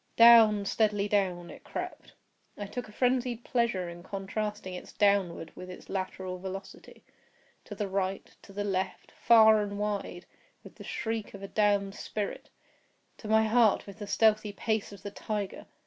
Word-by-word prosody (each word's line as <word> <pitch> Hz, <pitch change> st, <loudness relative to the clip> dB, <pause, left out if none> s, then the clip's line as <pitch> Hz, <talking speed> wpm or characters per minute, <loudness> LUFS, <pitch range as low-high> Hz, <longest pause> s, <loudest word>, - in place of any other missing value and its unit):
Down—steadily 215 Hz, -2 st, +6 dB
down 180 Hz, -4 st, 0 dB
it -, -, -13 dB
crept. -, -, -7 dB, 0.4 s
I 205 Hz, -, -4 dB
took 220 Hz, +3 st, -6 dB
a -, -, -13 dB
frenzied 250 Hz, 0 st, 0 dB
pleasure 235 Hz, -8 st, 0 dB
in 170 Hz, 0 st, -9 dB
contrasting 200 Hz, +1 st, -4 dB
its 180 Hz, -, -8 dB
downward 195 Hz, -5 st, +1 dB
with 180 Hz, -, -9 dB
its 180 Hz, -, -11 dB
lateral 185 Hz, -1 st, -4 dB
velocity. 190 Hz, +1 st, -9 dB, 0.6 s
To -, -, -8 dB
the 210 Hz, -, -2 dB
right—to 195 Hz, +1 st, -4 dB
the 205 Hz, +1 st, -3 dB
left—far 215 Hz, +3 st, +3 dB
and 205 Hz, -1 st, -4 dB
wide—with 205 Hz, -, -6 dB
the -, -, -12 dB
shriek 225 Hz, -2 st, -4 dB
of 200 Hz, -, -10 dB
a -, -, -5 dB
damned 205 Hz, -1 st, +1 dB
spirit! 210 Hz, 0 st, -5 dB, 0.7 s
to 220 Hz, -, -9 dB
my 220 Hz, +1 st, +4 dB
heart 220 Hz, -1 st, +3 dB
with 200 Hz, +1 st, -11 dB
the 205 Hz, -, -6 dB
stealthy 215 Hz, -1 st, +2 dB
pace 220 Hz, 0 st, -2 dB
of 200 Hz, -1 st, -12 dB
the 205 Hz, -, -6 dB
tiger! 205 Hz, -1 st, -5 dB
205 Hz, 150 wpm, -29 LUFS, 195-220 Hz, 0.7 s, Down—steadily